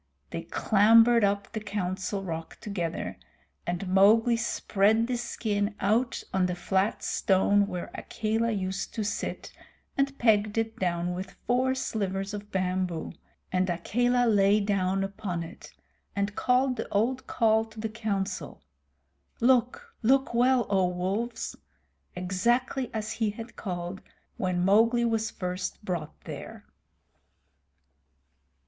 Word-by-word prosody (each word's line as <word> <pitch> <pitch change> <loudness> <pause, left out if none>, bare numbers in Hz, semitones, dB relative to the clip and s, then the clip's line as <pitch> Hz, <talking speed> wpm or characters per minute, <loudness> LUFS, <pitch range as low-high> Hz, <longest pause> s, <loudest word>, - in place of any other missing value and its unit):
They - - -3
clambered 225 +2 +5
up 200 0 0
the 220 - -3
Council 195 -1 -3
Rock 165 -3 -5
together, 170 - -4 0.5
and 175 +2 -2
Mowgli 215 +5 +5
spread 220 -1 +2
the 250 +1 -1
skin 210 -3 -2
out 225 +5 +1
on 185 -1 +2
the 180 - -2
flat 190 +3 0
stone 200 +1 +3
where 180 -3 -5
Akela 225 +1 -1
used 195 -2 -3
to 220 - -1
sit, 205 0 -4 0.4
and 275 0 0
pegged 215 -2 +3
it 225 0 -1
down 175 -1 0
with 185 +1 -7
four 255 +2 +2
slivers 195 -5 -2
of 205 0 -7
bamboo, 185 -2 -1 0.4
and 185 0 +1
Akela 245 +8 +1
lay 205 -2 +4
down 195 -2 +1
upon 195 -3 -3
it, 165 +4 -11 0.4
and 200 0 -1
called 255 0 +2
the - - -4
old 250 +5 0
call 220 -1 +3
to 220 0 -13
the 220 - -1
Council, 210 -3 -3 0.8
"Look 260 - +2
look 265 +2 +3
well, 245 0 +4
O 190 -2 +2
Wolves," 190 +7 -2 0.6
exactly 235 +8 0
as 215 -1 -3
he 225 -1 0
had 225 +3 -8
called 180 -1 -5 0.4
when 180 -2 0
Mowgli 230 +4 +4
was 225 -1 0
first 180 +2 -4
brought 170 -5 -4
there. - - -8
205 Hz, 130 wpm, -28 LUFS, 185-230 Hz, 0.8 s, clambered